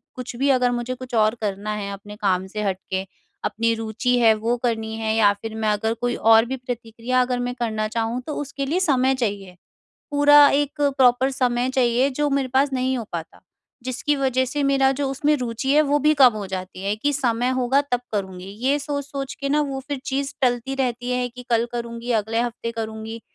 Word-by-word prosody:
कुछ 250 Hz, -1 st, -6 dB
भी 275 Hz, +4 st, +1 dB
अगर 250 Hz, -2 st, +3 dB
मुझे 240 Hz, +1 st, -2 dB
कुछ 255 Hz, -1 st, -7 dB
और 215 Hz, 0 st, +3 dB
करना 205 Hz, 0 st, -2 dB
है 200 Hz, -1 st, -4 dB
अपने 205 Hz, +1 st, -10 dB
काम 190 Hz, -2 st, 0 dB
से 210 Hz, +2 st, -4 dB
हट 195 Hz, -2 st, 0 dB
के, 190 Hz, 0 st, -1 dB, 0.4 s
अपनी 225 Hz, +2 st, +1 dB
रुचि 225 Hz, +3 st, -1 dB
है 225 Hz, -2 st, +6 dB
वो 225 Hz, +3 st, 0 dB
करनी 220 Hz, -2 st, -1 dB
है, 220 Hz, -1 st, -1 dB
या 210 Hz, -2 st, +5 dB
फिर 225 Hz, -1 st, -6 dB
मैं 220 Hz, -1 st, 0 dB
अगर 210 Hz, +2 st, 0 dB
कोई 245 Hz, 0 st, 0 dB
और 225 Hz, 0 st, +5 dB
भी 265 Hz, +2 st, -4 dB
प्रतिक्रिया 245 Hz, 0 st, -2 dB
अगर 250 Hz, 0 st, 0 dB
मैं 245 Hz, 0 st, -3 dB
करना 220 Hz, -3 st, -2 dB
चाहूँ, 230 Hz, +2 st, -2 dB
तो 300 Hz, -, -3 dB
उसके 280 Hz, -1 st, -4 dB
लिए 320 Hz, +7 st, 0 dB
समय 265 Hz, -7 st, +2 dB
चाहिए। 200 Hz, -7 st, -3 dB, 0.6 s
पूरा 290 Hz, 0 st, +7 dB
एक 290 Hz, +1 st, 0 dB, 0.2 s
प्रॉपर 255 Hz, +1 st, +4 dB
समय 250 Hz, -2 st, 0 dB
चाहिए 255 Hz, 0 st, +2 dB
जो 295 Hz, 0 st, +1 dB
मेरे 275 Hz, -1 st, 0 dB
पास 275 Hz, +1 st, +3 dB
नहीं 260 Hz, 0 st, 0 dB
हो 230 Hz, -, -4 dB
पाता, 165 Hz, -2 st, -6 dB, 0.4 s
जिसकी 260 Hz, +4 st, -1 dB
वज़ह 260 Hz, -1 st, +1 dB
से 290 Hz, +3 st, -2 dB
मेरा 275 Hz, -1 st, +3 dB
जो 275 Hz, 0 st, -2 dB
उसमें 290 Hz, +3 st, +1 dB
रुचि 250 Hz, 0 st, -3 dB
है, 305 Hz, -, +6 dB
वो 290 Hz, 0 st, +2 dB
भी 300 Hz, +2 st, +3 dB
कम 265 Hz, -4 st, +7 dB
हो 210 Hz, -2 st, -5 dB
जाती 185 Hz, 0 st, -6 dB
है 200 Hz, +1 st, +1 dB
कि 290 Hz, +7 st, 0 dB
समय 245 Hz, -3 st, 0 dB
होगा 260 Hz, +3 st, +3 dB
तब 245 Hz, -, +2 dB
करूँगी। 190 Hz, -3 st, -3 dB, 0.2 s
ये 280 Hz, +2 st, +3 dB
सोच-सोच 285 Hz, -1 st, -4 dB
के 280 Hz, -, -2 dB
ना 295 Hz, +2 st, +2 dB
वो 270 Hz, -, -3 dB
फिर 285 Hz, -1 st, -2 dB
चीज़ 275 Hz, +1 st, -2 dB
टलती 245 Hz, +1 st, +1 dB
रहती 250 Hz, -2 st, -2 dB
है 250 Hz, 0 st, 0 dB
कि 250 Hz, +1 st, -11 dB
कल 230 Hz, 0 st, +2 dB
करुँगी, 235 Hz, 0 st, -4 dB
अगले 225 Hz, +1 st, 0 dB
हफ्ते 235 Hz, -1 st, -3 dB
करूँगी, 220 Hz, 0 st, -6 dB
245 Hz, 210 wpm, -23 LUFS, 220-270 Hz, 0.6 s, पूरा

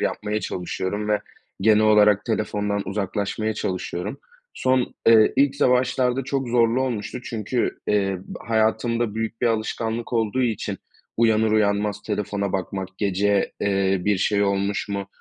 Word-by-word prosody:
yapmaya 105 Hz, +1 st, -1 dB
çalışıyorum 95 Hz, +3 st, -3 dB
ve 105 Hz, -1 st, +2 dB, 0.4 s
genel 110 Hz, +1 st, +4 dB
olarak 105 Hz, -1 st, +5 dB
telefondan 105 Hz, -2 st, -1 dB
uzaklaşmaya 105 Hz, +2 st, -2 dB
çalışıyorum. 90 Hz, -2 st, -4 dB, 0.4 s
Son 130 Hz, -1 st, +1 dB
eee, 110 Hz, -1 st, +6 dB
ilk 140 Hz, 0 st, +3 dB
za 130 Hz, -, +3 dB
başlarda 125 Hz, 0 st, +1 dB
çok 135 Hz, -2 st, -2 dB
zorlu 120 Hz, +1 st, +3 dB
olmuştu 125 Hz, -1 st, -3 dB
çünkü, 115 Hz, +1 st, -2 dB
eee, 95 Hz, -2 st, +1 dB
ba -, -, -8 dB
hayatımda 110 Hz, 0 st, +1 dB
büyük 110 Hz, 0 st, -3 dB
bir 120 Hz, -, +2 dB
alışkanlık 115 Hz, +1 st, -2 dB
olduğu 115 Hz, +2 st, +1 dB
için 115 Hz, -4 st, -2 dB, 0.4 s
uyanır 110 Hz, -1 st, +3 dB
uyanmaz 105 Hz, -1 st, +1 dB
telefona 100 Hz, -2 st, -2 dB
bakmak, 95 Hz, 0 st, -3 dB
gece, 100 Hz, 0 st, +1 dB
eee, 95 Hz, -1 st, +1 dB
bir 105 Hz, -1 st, +2 dB
şey 100 Hz, +1 st, +2 dB
olmuş 100 Hz, +1 st, 0 dB
mu 100 Hz, -1 st, -3 dB
105 Hz, 140 wpm, -23 LUFS, 100-115 Hz, 0.4 s, eee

